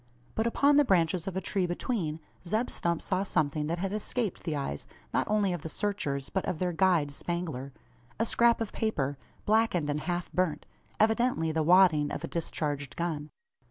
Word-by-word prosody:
But 220 +1 0
upon 280 +5 +4
the 295 - +7
branches 180 - +2
of 190 -1 -3
a - - -1
tree 190 -3 0
between, 175 -3 -2 0.2
Zeb 215 +7 -1
Stump 170 -1 -1
saw 185 -1 0
something 150 -5 0
that 170 +2 -1
had 195 +2 -2
escaped 215 -1 -2
the 160 - -1
eyes 135 - -4 0.3
not - - +1
only 205 -3 +2
of 175 - -4
the 160 - -6
searchers, 150 -8 -2
but 190 - -1
of 170 - -2
their 180 +1 -1
guide 165 -4 +3
Spangler 155 -4 -4 0.5
a 230 - +2
scrap 235 0 +3
of 225 - -2
paper, 145 -11 -1 0.3
blackened 210 -8 +2
and 145 - -1
half 175 +2 -3
burnt 170 -5 0 0.3
evidently 220 -6 +2
the 160 0 0
wadding 160 -3 +5
of - - -4
a - - -2
discharged 145 -4 -3
gun! 160 -4 -3
175 Hz, 185 wpm, -29 LUFS, 155-205 Hz, 0.5 s, the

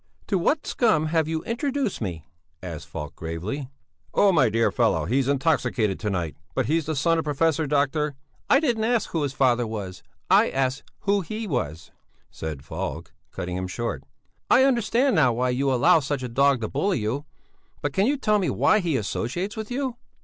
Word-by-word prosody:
"To 195 - +2
what 295 - +1
scum 215 -11 +2
have 160 -2 +2
you 160 0 -2
introduced 260 - -2
me?" 85 -7 -4 0.4
asked 85 -4 -7
Falk 75 -1 -7
gravely. 90 - -5 0.5
"Oh, 200 - +5
my 140 -9 +4
dear 115 +1 +2
fellow, - - +1
he's 130 +7 +1
intoxicated 135 - +1
to 105 - -2
night, 85 -7 -2 0.2
but - - +1
he's 160 0 0
the 160 - -1
son 165 +4 +2
of - - -1
Professor 155 +1 +1
Dr...." 145 +1 +1 0.3
"I 275 - +6
didn't 240 -8 0
ask 235 -1 +1
who 165 - 0
his 140 -2 -1
father 125 -3 +2
was, 100 -4 -6 0.3
I - - +5
asked 135 0 0 0.2
who 200 0 +2
he 215 +6 -5
was," 80 - -3 0.4
said 75 -4 -6
Falk, - - -5 0.2
cutting 90 -1 -5
him 95 0 -3
short, 90 - -4 0.5
"I 260 - +6
understand 250 0 +2
now 130 -6 +4
why 125 +2 0
you 135 +2 +1
allow 165 +7 +5
such 140 -2 -3
a - - -2
dog 135 +1 +3
to 110 - -1
bully 185 - 0
you; 120 +6 -2 0.6
but 145 -1 -1
can 195 +8 +2
you 285 +2 +1
tell 215 -5 +2
me 185 - 0
why 215 - +3
he 170 -7 0
associates 130 - -3
with 220 -1 -5
you?" 255 -1 -2
145 Hz, 190 wpm, -25 LUFS, -, 0.6 s, I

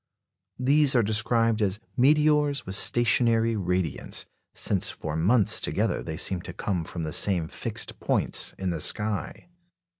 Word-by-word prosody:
These 140 +2 +3
are 120 - +4
described 110 +1 +1
as 100 0 0 0.2
"meteors 150 +1 +2
with 95 - -6
stationary 115 +2 +3
radiants," 90 -5 -2 0.3
since 95 -1 +1
for 80 -3 -6
months 100 +6 +3
together - - -1
they - - -6
seem 95 -3 +1
to - - -9
come 90 -5 -3
from 85 0 -6
the 80 0 -4
same 90 -3 +1
fixed - - -5
points - - 0
in 95 -1 -2
the 85 - -4
sky. 105 +9 -3
105 Hz, 145 wpm, -26 LUFS, 90-120 Hz, 0.3 s, are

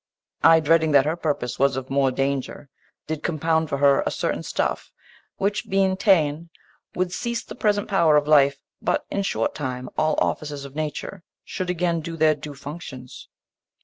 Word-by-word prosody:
I, 165 0 +7
dreading 160 0 +3
that 140 -1 +6
her 155 +2 0
purpose 145 -7 -3
Was 135 0 +2
of 130 0 -6
more 135 -1 +3
danger, 135 +1 -3 0.4
did 155 -1 -4
compound 160 -1 0
for 140 - -1
her 140 0 +4
A - - -1
certain - - -2
stuff, - - -2 0.5
which, 200 +1 -1
being 190 -1 +2
ta'en 170 -5 +2 0.5
would 180 0 -1
cease 235 +3 -3
The - - -9
present 205 -1 0
pow'r 170 -7 +3
of 145 0 +1
life, 140 -2 +5 0.2
but - - 0
in 200 - 0
short 195 - -1
time 130 -3 -5
All 155 0 +2
offices 145 -2 -2
of 135 - -10
nature 155 +5 -4 0.2
should 185 -1 -5
again 175 -1 0
Do 165 +1 -6
their 155 -1 +4
due 150 -1 -9
functions. 135 -3 -9
155 Hz, 175 wpm, -23 LUFS, 140-170 Hz, 0.5 s, I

